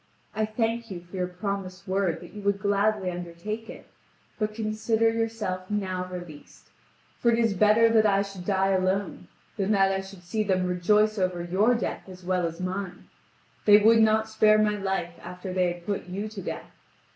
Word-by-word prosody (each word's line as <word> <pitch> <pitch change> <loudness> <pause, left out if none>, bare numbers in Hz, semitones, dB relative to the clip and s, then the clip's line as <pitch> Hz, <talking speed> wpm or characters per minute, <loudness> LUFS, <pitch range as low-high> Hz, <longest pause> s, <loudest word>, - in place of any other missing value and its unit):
I 215 0 0
thank 225 +1 -1
you 185 -3 -5
for 175 +2 -13
your 180 -1 -1
promised 195 0 -5
word 185 -3 0
that - - -12
you 210 - -8
would 200 0 +1
gladly 200 -1 +1
undertake 175 +6 -6
it, - - -10 0.5
but 215 -1 -1
consider 220 +1 +1
yourself 225 -5 -3
now 185 -3 -2
released, 175 -5 -10 0.5
for 235 - +3
it 230 - +3
is 230 -3 +2
better 215 +4 +5
that 220 -1 +4
I 200 -1 +3
should 195 -2 -9
die 195 0 +1
alone 190 +1 0 0.3
than 195 -1 -1
that 195 -1 +4
I 195 0 -1
should 195 -2 -12
see 215 +5 -2
them 185 -3 +1
rejoice 210 +4 +2
over 180 -2 0
your 200 +8 +2
death 230 - -4
as 185 0 -11
well 180 -1 +1
as 165 +1 -8
mine; 185 +1 -5 0.6
they 205 -1 +9
would 225 +2 +5
not 220 0 +4
spare 215 -1 +4
my 210 -1 +2
life 190 -4 -2
after 180 +1 -7
they 180 -1 +2
had 175 0 -9
put 200 -3 -3
you 195 +4 -4
to 210 -2 -7
death. - - -6
195 Hz, 190 wpm, -26 LUFS, 185-215 Hz, 0.6 s, they